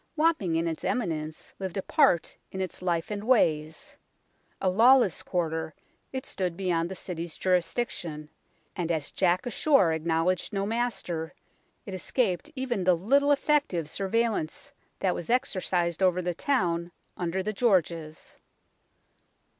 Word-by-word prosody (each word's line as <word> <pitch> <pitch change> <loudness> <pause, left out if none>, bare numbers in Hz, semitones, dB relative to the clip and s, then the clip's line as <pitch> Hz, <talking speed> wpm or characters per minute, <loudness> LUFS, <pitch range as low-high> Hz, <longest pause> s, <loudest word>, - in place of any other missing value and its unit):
Wapping 305 - +2
in 165 +1 +1
its 160 -1 -4
eminence 160 -9 -3
lived 190 -1 -4
apart 195 - +2 0.2
in 190 - -5
its 185 -1 -4
life 175 0 -1
and 205 0 -3
ways. 160 -10 +1 0.6
A 190 - 0
lawless 225 +1 +5
quarter, 160 -3 -2 0.4
it 260 -1 -4
stood 180 -3 -3
beyond 175 -3 0
the 190 - -5
City's 170 -3 -5
jurisdiction, 170 -4 -1 0.4
and 170 -2 -1
as 155 -4 -2
Jack 185 +4 +1
ashore 240 - +3
acknowledged 165 +4 0
no 195 0 0
master, 205 -8 -2 0.5
it 195 - -7
escaped 190 - 0
even 255 -7 -1
the 180 -1 +4
little 280 +10 +3
effective 285 - +1
surveillance 195 0 -1 0.3
that 185 -2 +2
was 170 - -6
exercised 185 -8 0
over 185 -1 +3
the 180 -1 -1
town 175 - 0 0.2
under 180 +2 -2
the 215 - -2
Georges. 170 -8 0
185 Hz, 130 wpm, -28 LUFS, 165-225 Hz, 0.6 s, lawless